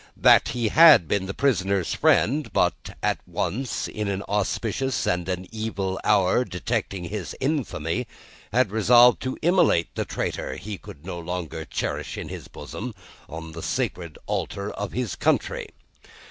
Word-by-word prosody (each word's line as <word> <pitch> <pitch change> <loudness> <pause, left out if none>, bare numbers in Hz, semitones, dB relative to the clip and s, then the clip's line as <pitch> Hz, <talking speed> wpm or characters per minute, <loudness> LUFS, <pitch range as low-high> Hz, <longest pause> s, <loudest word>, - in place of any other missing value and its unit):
That, - - +6
he 120 -3 -1
had 155 - +8
been 95 +1 0
the 95 - -4
prisoner's 100 -9 +1
friend, 145 +6 +2
but, - - 0
at - - +1
once 125 +4 -2
in 105 -1 -4
an 100 0 -2
auspicious 110 +5 -1
and 90 0 0
an 90 0 -2
evil 105 -4 -3
hour 100 +3 +3
detecting 90 -2 -3
his 85 -3 -5
infamy, 125 - -1 0.4
had 125 -5 +2
resolved 120 +3 +6
to 130 0 -3
immolate 170 - +3
the - - -1
traitor - - -3
he 105 -2 -7
could 75 +3 -12
no 90 -2 -5
longer 85 -2 -5
cherish - - -3
in - - -6
his - - -8
bosom, 85 - -7 0.3
on 80 0 -7
the 85 +1 -8
sacred 85 -1 -3
altar 100 +1 -3
of 105 -2 -5
his 125 -5 -2
country. - - 0
100 Hz, 150 wpm, -25 LUFS, 90-125 Hz, 0.4 s, had